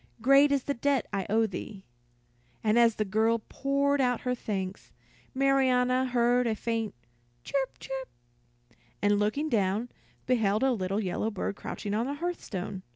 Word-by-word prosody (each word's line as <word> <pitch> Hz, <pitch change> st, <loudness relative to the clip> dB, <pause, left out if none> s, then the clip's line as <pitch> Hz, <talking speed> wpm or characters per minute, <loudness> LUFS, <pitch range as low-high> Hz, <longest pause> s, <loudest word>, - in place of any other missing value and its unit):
Great 275 Hz, +4 st, +5 dB
is 280 Hz, -2 st, +1 dB
the 285 Hz, -, -1 dB
debt 275 Hz, 0 st, +1 dB
I 195 Hz, -2 st, -2 dB
owe 225 Hz, +2 st, +3 dB
thee." 195 Hz, 0 st, -7 dB, 0.8 s
And 220 Hz, +2 st, +3 dB
as 230 Hz, -2 st, +5 dB
the 215 Hz, -, -1 dB
girl 220 Hz, +3 st, +1 dB
poured 280 Hz, +1 st, +1 dB
out 245 Hz, -2 st, +1 dB
her 250 Hz, -, -1 dB
thanks, 195 Hz, -5 st, -4 dB, 0.4 s
Marianna 260 Hz, -2 st, +3 dB
heard 245 Hz, 0 st, +2 dB
a 220 Hz, -, 0 dB
faint 225 Hz, -, -2 dB, 0.5 s
"chirp, 270 Hz, -, -2 dB
chirp," 265 Hz, -1 st, -6 dB, 0.9 s
and 205 Hz, 0 st, +2 dB
looking 215 Hz, +9 st, 0 dB
down, 215 Hz, -1 st, 0 dB, 0.4 s
beheld 220 Hz, -3 st, +2 dB
a 265 Hz, -, +4 dB
little 195 Hz, -3 st, -1 dB
yellow 205 Hz, +2 st, -1 dB
bird 200 Hz, -1 st, -3 dB
crouching 205 Hz, 0 st, -5 dB
on 225 Hz, +4 st, 0 dB
the 285 Hz, -, -3 dB
hearthstone. 215 Hz, -, -4 dB
235 Hz, 155 wpm, -28 LUFS, 210-265 Hz, 0.9 s, Great